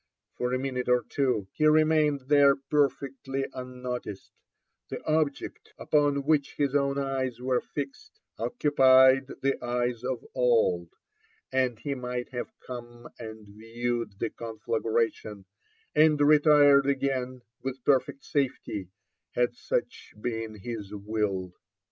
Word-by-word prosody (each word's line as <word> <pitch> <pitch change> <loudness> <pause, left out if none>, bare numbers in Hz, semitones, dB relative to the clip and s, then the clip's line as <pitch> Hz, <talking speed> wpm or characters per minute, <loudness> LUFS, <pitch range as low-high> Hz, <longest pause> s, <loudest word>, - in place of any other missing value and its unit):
For 125 0 -2
a 130 - +1
minute 130 -1 -3
or 125 0 +3
two 125 -8 0
he 155 - +2
remained 155 -2 +3
there 140 +1 +5
perfectly 135 -1 -1
unnoticed: 125 -5 -6 0.6
the - - -5
object 155 -2 -2
upon 145 -2 +1
which 150 -2 +1
his 140 -2 0
own 140 -1 +1
eyes 135 -3 -2
were 125 0 0
fixed 280 - -7 0.2
occupied 130 - +5 0.2
the 135 -2 0
eyes 120 -1 -1
of 125 -2 -3
all, 110 -9 +2 0.6
and 130 -3 +1
he 140 +5 -3
might 125 -1 -4
have 125 -2 -5
come 120 -1 -9
and 110 -2 -9
viewed 115 +1 -4
the 115 +1 -2
conflagration, 110 -2 -2 0.5
and 155 -1 +4
retired 145 -2 +6
again 130 -2 -1 0.2
with 135 -1 -5
perfect 135 0 +1
safety, 125 - -2 0.5
had 120 0 +2
such - - -4
been 115 -1 -4
his 105 -1 -7
will. 100 -3 -2
125 Hz, 120 wpm, -28 LUFS, 120-140 Hz, 0.6 s, retired